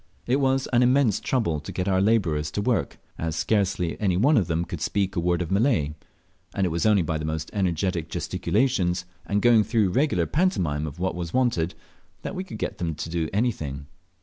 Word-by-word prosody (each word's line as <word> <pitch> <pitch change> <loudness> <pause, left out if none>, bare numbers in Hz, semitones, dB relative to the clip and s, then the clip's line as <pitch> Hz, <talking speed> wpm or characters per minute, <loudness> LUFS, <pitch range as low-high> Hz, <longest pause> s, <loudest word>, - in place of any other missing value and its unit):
It 125 +3 +2
was 135 -1 +1
immense 125 -2 +4
trouble 105 - 0
to 75 - -8
get 90 - -3
our 95 -1 +2
labourers 90 -9 +1
to 105 - -1
work, 120 -2 0 0.2
as 80 -1 -2
scarcely 95 -3 0 0.2
one 140 +10 +4
of 100 - +2
them 85 +1 -1
could 85 -2 -6
speak 100 +2 -1
a - - +1
word 85 +1 +1
of 85 - -7
Malay; 100 - +2 0.6
and 95 - +1
it - - +1
was 85 +5 0
only 105 -4 +4
by 80 -1 -2
the - - -4
most 80 0 -3
energetic 90 -3 -1
gesticulations, 90 0 0 0.2
and 100 +3 0
going 120 -3 +6
through 110 -3 +1
a - - -4
regular 130 - +2
pantomime 85 - 0
of 75 - -8
what 95 +1 -1
was 85 -1 -5
wanted, 120 -10 +1 0.5
that - - -4
we 185 - -3
could 185 - -8
get - - -4
them 85 -3 -2
to 80 +2 -6
do 80 -2 -1
anything. 80 - -2
95 Hz, 200 wpm, -25 LUFS, 80-115 Hz, 0.6 s, going